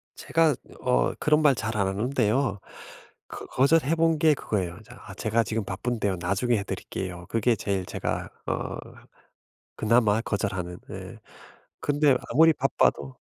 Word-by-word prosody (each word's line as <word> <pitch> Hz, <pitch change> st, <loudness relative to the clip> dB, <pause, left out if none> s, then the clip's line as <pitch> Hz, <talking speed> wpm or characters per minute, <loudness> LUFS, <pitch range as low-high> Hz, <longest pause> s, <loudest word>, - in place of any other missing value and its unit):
제가 160 Hz, -4 st, +2 dB, 0.3 s
어 60 Hz, -1 st, +2 dB
그런 150 Hz, 0 st, +3 dB
말 145 Hz, -4 st, +5 dB
잘 110 Hz, 0 st, -3 dB
안 100 Hz, -1 st, +2 dB
하는데요. 110 Hz, +1 st, 0 dB, 0.7 s
그 -, -, -8 dB
거절해 150 Hz, +3 st, +3 dB
본 165 Hz, -1 st, +2 dB
게 155 Hz, -1 st, +5 dB
그거예요. 90 Hz, -8 st, -3 dB
자 120 Hz, +2 st, -14 dB
아 100 Hz, -, -9 dB
"제가 115 Hz, +2 st, +1 dB
지금 110 Hz, +1 st, -2 dB
바쁜데요. 100 Hz, -1 st, -2 dB
나중에 100 Hz, +7 st, +1 dB
해 100 Hz, -, -2 dB
드릴게요." 90 Hz, -2 st, -6 dB
그게 115 Hz, +1 st, +2 dB
제일 100 Hz, -3 st, -2 dB
제가 -, -, -3 dB, 0.2 s
어 -, -, -2 dB, 1.0 s
그나마 110 Hz, -1 st, +3 dB
거절하는. 95 Hz, -5 st, -3 dB
네. -, -, -8 dB, 0.6 s
근데 145 Hz, -2 st, +3 dB
아무리 160 Hz, +2 st, +6 dB
바빠도 135 Hz, -1 st, 0 dB
115 Hz, 285 characters per minute, -26 LUFS, 100-140 Hz, 1.0 s, 아무리